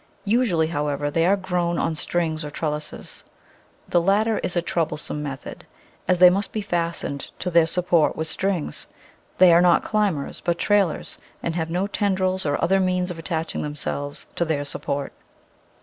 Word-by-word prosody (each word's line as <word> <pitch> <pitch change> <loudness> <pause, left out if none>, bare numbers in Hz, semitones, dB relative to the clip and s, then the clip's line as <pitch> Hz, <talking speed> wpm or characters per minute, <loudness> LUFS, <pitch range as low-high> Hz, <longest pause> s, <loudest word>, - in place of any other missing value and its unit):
Usually, 205 -7 +2
however, 145 -2 -1
they 165 +3 +2
are 200 +2 +4
grown 180 -3 -1
on 165 - 0
strings 160 0 -1
or 150 - -5
trellises. 150 0 -4 0.6
The 175 - +3
latter 210 +4 +2
is 180 - -3
a 175 - +2
troublesome 155 -3 -2
method, 140 -3 -6 0.4
as 185 - +3
they 180 0 +8
must 200 +2 -1
be 215 - -2
fastened 170 -6 -2
to 180 - -3
their 165 -1 +5
support 170 -2 +2
with 160 - -3
strings. 185 -1 -2 0.5
They 180 -2 +7
are 170 - +6
not 175 -1 +4
climbers, 205 -9 -1
but 170 -1 +1
trailers, 200 -5 +1 0.2
and 170 - -1
have 165 -1 -2
no 180 +3 0
tendrils 190 -3 0
or 145 - 0
other 195 +2 +3
means 180 -1 +1
of 170 - -7
attaching 165 -1 -3
themselves 145 -1 -4
to - - +2
their 155 -3 -1
support. 140 0 -3
170 Hz, 165 wpm, -23 LUFS, 155-185 Hz, 0.6 s, they